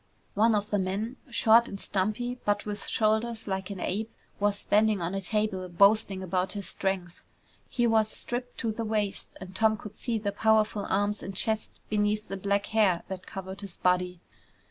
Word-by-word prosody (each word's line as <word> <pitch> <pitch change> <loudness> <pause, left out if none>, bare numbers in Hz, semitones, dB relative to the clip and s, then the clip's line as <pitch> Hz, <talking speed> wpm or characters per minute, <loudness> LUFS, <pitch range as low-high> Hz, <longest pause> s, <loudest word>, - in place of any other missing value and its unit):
One 220 +2 +4
of 210 0 -1
the 205 - +2
men, 200 +7 -2
short 235 0 +5
and 195 - -7
stumpy, 215 +7 -1
but 205 0 0
with 210 -1 -5
shoulders 220 +1 +1
like 190 -1 -2
an 200 -2 -6
ape, 215 +5 -2 0.3
was 205 0 +2
standing 210 0 +3
on 170 +2 -2
a 195 - -2
table 200 -2 -1
boasting 200 +1 +4
about 185 +1 -1
his 200 -3 -5
strength. 185 -3 -2 0.5
He 240 - +1
was 220 -2 +3
stripped 245 +2 -4
to 230 -3 0
the 225 +1 -4
waist 215 -2 -2
and 190 0 -10
Tom 220 +1 +3
could 210 0 -10
see 235 -3 -1
the 205 -1 -2
powerful 215 -1 +2
arms 205 +1 +1
and 195 - -6
chest 220 +3 0
beneath 210 0 0
the 195 - -3
black 200 +1 0
hair 200 -6 +3
that 190 -1 -6
covered 190 +1 -7
his 195 -3 -8
body. 180 -1 +1
205 Hz, 185 wpm, -28 LUFS, 190-220 Hz, 0.5 s, short